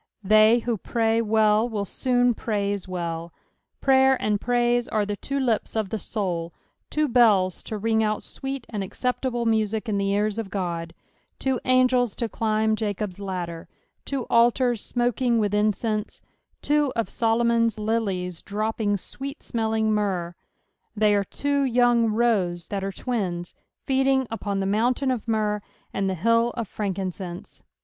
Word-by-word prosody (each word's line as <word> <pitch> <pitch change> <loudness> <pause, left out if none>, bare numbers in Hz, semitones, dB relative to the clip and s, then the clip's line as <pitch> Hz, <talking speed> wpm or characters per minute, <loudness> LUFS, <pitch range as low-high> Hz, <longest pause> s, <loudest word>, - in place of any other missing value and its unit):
They 215 +3 +5
who 235 -1 -1
pray 225 +1 +1
well, 220 +1 +3
will 210 -3 -2
soon 245 +3 +1
praise 205 -3 -2
well: 170 -2 -4 0.5
prayer 265 -1 +4
and 210 -1 0
praise 240 0 +1
are 210 -1 0
the 205 0 -3
two 275 +7 -3
lips 235 -5 0
of 215 -3 -1
the 220 - -3
soul; 175 -5 -3 0.3
two 305 0 +1
bells 210 -8 +3
to 215 - -5
ring 220 +1 +1
out 215 0 -1
sweet 270 -2 -5
and 210 -3 -3
acceptable 245 +3 -2
music 220 0 0
in 205 -2 0
the 195 0 0
ears 210 +2 0
of 225 - -3
Ood; 170 -4 -4 0.4
two 265 -2 0
angels 255 -2 +3
lo 235 - 0
climb 220 0 +1
Jacob's 205 -3 -3
ladder: 180 -4 -5 0.4
two 275 -3 -3
altars 240 0 +3
smoking 245 0 +1
with 205 -2 +1
incense; 215 +1 0 0.4
two 295 -2 +2
of 230 -1 0
Solomon's 230 -1 +1
lilies 200 -5 -2
dropping 210 0 -1
sweet 275 - -8
smelling 220 -2 0
myrrh; 190 -5 -1 0.6
they 210 -1 +3
are 200 -1 +2
two 280 +7 -1
young 245 -2 +3
roes 205 -7 +1
that 200 -1 -2
ere 195 - -2
twins, 185 -7 -3 0.3
feeding 265 0 +2
upon 200 -3 -2
the - - -1
mountain 240 +6 +1
of 240 -3 -3
myrrh 210 -2 0 0.3
and 195 -1 0
the 190 - -1
hill 230 +6 +3
of 230 -3 -2
frankincense. 185 -3 -5
220 Hz, 150 wpm, -25 LUFS, 200-240 Hz, 0.6 s, They